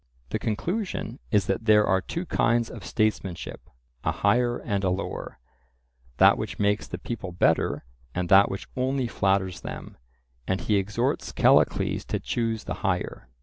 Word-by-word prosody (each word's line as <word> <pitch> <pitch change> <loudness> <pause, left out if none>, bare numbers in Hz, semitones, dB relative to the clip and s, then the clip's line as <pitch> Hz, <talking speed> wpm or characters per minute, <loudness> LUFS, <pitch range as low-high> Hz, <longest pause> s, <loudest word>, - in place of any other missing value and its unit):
The - - -2
conclusion 165 - -3
is 105 -3 +3
that 95 +4 -1
there 105 -1 +6
are 95 0 +2
two 170 - -4
kinds 120 -6 +1
of - - -9
statesmanship, 105 -5 -2 0.3
a - - +1
higher 120 +4 +2
and 100 -3 -2
a 95 - +2
lower—that 60 -7 -1
which - - -4
makes 105 +1 +1
the - - -5
people 105 -6 -5
better, 85 -7 +1 0.3
and 90 0 -1
that 100 +1 +7
which 95 - -5
only 130 0 0
flatters 95 -4 0
them, - - -8 0.5
and 95 +1 0
he 105 - +1
exhorts 100 +1 -1
Callicles - - +3
to - - -2
choose 115 -2 -2
the 90 - -4
higher. 90 - -2
100 Hz, 150 wpm, -26 LUFS, 95-115 Hz, 0.5 s, that